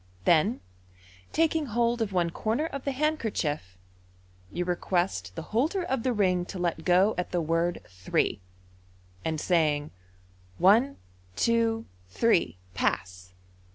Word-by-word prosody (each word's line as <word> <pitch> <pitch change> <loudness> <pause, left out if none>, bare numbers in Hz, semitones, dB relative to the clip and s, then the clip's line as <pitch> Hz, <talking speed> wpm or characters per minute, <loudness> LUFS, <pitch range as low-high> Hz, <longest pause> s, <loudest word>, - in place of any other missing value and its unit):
Then, 175 +9 +3 0.7
taking 320 -2 +1
hold 235 +1 +1
of 215 -3 -1
one 175 -3 +1
corner 225 - -1
of 275 -4 -6
the 280 - 0
handkerchief, 220 - -1 0.7
you 175 - -2
request 175 - -1
the - - -5
holder 315 - +1
of 265 -8 -1
the 255 - 0
ring 185 -5 +2
to 190 - -7
let 175 -2 -1
go 185 +4 +4
at 180 - -2
the 180 - 0
word 165 +2 0
" - - -19
Three," 95 - 0 0.8
and 160 -1 -1
saying, 155 -4 +2
u 150 - -12 0.7
One, 230 +9 +4 0.4
two, 230 - +1 0.2
three 175 - +2
— 90 - -29
Pass 90 0 -2
185 Hz, 140 wpm, -28 LUFS, 165-235 Hz, 0.8 s, go